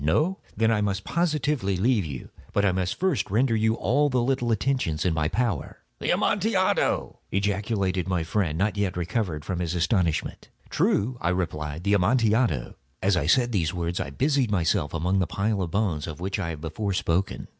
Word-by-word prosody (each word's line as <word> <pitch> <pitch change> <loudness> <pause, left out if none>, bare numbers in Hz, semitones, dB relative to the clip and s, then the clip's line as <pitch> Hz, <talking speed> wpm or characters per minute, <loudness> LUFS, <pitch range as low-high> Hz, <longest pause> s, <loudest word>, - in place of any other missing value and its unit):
No? 155 - +1 0.2
Then 115 +1 +3
I 105 -2 +2
must 100 -1 -1
positively 150 - 0
leave 110 0 +2
you. 70 -4 -7 0.2
But 100 - +2
I 100 - +4
must 90 -1 -2
first 185 - 0
render 115 +4 +2
you 110 +1 +2
all 140 +8 +2
the 125 -3 +1
little 125 -2 0
attentions 110 - 0
in 90 - +2
my 80 -1 +1
power." 105 - -2 0.2
"The - - -2
Amontillado!" 200 -2 +1
ejaculated 100 -2 0
my 90 -3 0
friend, 80 -2 -1
not 105 +3 0
yet 100 -3 -1
recovered 85 -4 -2
from 90 -2 -3
his 85 -1 -2
astonishment. 85 -1 0 0.2
"True," 120 +4 +1
I 85 - +1
replied; 80 -3 -2
"the 100 +1 +2
Amontillado." 105 - +2 0.3
As 100 0 +3
I 80 -4 0
said 120 +6 +3
these 85 -6 0
words 85 0 -2
I - - -3
busied 135 - +1
myself 85 -4 0
among 90 +4 +1
the 90 - +1
pile 100 0 0
of 90 - -2
bones 90 -6 -1
of 80 -1 -7
which 95 +3 -3
I 90 -4 -2
have 80 -3 -6
before 95 +5 -3
spoken. 90 +1 -1
100 Hz, 190 wpm, -26 LUFS, 85-115 Hz, 0.3 s, I